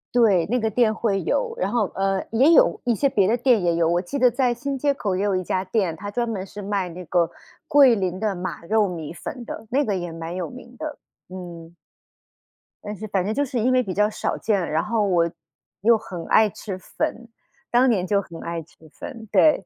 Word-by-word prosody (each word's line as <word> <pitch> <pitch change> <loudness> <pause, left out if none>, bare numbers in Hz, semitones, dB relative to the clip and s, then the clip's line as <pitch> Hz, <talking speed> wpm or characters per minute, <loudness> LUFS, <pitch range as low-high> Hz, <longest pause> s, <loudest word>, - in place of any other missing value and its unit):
对， 200 -8 +4
那 235 +8 0
个 220 - +1
店 220 0 +2
会 200 -4 0
有。 485 -2 0
然 - - 0
后， 225 -5 0
呃， 195 0 0
也 270 +9 +5
有 - - +5
一 240 -2 +2
些 275 +6 +2
别 195 -6 +2
的 225 - +3
店 245 -3 +3
也 170 -1 +1
有， 165 -1 +2
我 175 +1 +2
记 195 +10 -5
得 250 -2 +5
在 250 -1 +1
新 275 +3 -4
街 285 +1 +1
口 205 -8 -2
也 190 - -1
有 200 -2 +1
一 185 - -1
家 185 +2 -1
店， 185 -4 0
它 205 +5 -7
专 235 +2 -1
门 195 -4 -3
是 205 +1 -9
卖 200 -2 -1
那 180 +1 -8
个 170 0 +1 0.4
桂 285 -6 +6
林 185 -3 -2
的 210 0 -1
马 180 -2 -5
肉 210 +3 +2
米 165 -4 -6
粉 240 +8 -7
的， 225 - -8
那 280 +4 +2
个 210 -7 -1
也 175 -2 -5
蛮 165 +1 -6
有 180 - -3
名 250 -1 -12
的， 310 -1 -5 0.3
嗯。 175 -2 -9 1.1
但 210 0 -5
是 215 +2 -7
反 190 -3 0
正 210 - -1
就 285 +5 +1
是 260 -2 -3
因 245 +4 +2
为 255 0 +3
比 190 -5 -4
较 210 +1 +2
少 215 - -2
见， 200 -5 0
然 155 +1 +1
后 215 -1 0
我 170 -3 +2 0.5
又 230 +2 +5
很 180 -6 -8
爱 220 -1 +5
吃 195 -1 -7
粉， 230 +5 -4 0.4
当 250 +2 +5
年 190 -6 +1
就 200 0 +2
很 170 -3 -11
爱 170 -1 -4
吃 155 - -26
粉， 225 -3 -9
对。 310 -1 +4
205 Hz, 245 characters per minute, -23 LUFS, 180-240 Hz, 1.1 s, 桂